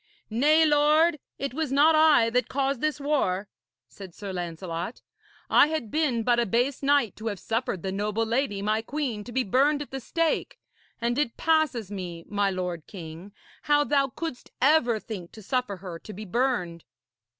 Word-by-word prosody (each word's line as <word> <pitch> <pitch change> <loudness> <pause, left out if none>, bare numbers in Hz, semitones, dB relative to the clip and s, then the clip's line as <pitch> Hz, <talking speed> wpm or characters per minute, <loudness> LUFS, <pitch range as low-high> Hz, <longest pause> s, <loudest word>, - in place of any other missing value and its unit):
'Nay, 300 +8 +4
lord, 305 +2 +4 0.2
it 275 -3 -3
was 310 -1 -2
not 295 +4 +5
I 310 -7 +5
that 250 0 +1
caused 275 -1 -1
this 305 -1 0
war,' 235 -10 0 0.4
said 190 -4 -12
Sir 200 -2 -6
Lancelot. 175 +2 -5 0.4
'I - - +6
had 305 -9 -3
been 275 -8 +1
but 240 +1 +3
a 235 - +1
base 245 +6 0
knight 280 -6 +2
to 220 - -6
have 205 -4 -3
suffered 225 -6 -2
the 190 - -2
noble 210 +3 -1
lady 230 -4 -1
my 215 +1 +1
queen 245 -4 -3
to 245 - -10
be 260 +1 +1
burned 275 +8 +2
at 290 - -7
the 270 - -4
stake. 330 +6 -1 0.4
And 240 +3 0
it 255 -6 -1
passes 305 - +1
me, 175 -4 -6
my 205 -1 +1
lord 180 -4 -4
king, 170 +1 -9 0.3
how 290 0 +3
thou 280 -1 +2
couldst 270 0 -6
ever 255 -5 +4
think 195 -6 -8
to 215 - -12
suffer 250 -3 -1
her 180 -2 -8
to 215 - -10
be 215 +3 -8
burned.' 180 -6 -1
235 Hz, 180 wpm, -26 LUFS, 200-285 Hz, 0.4 s, I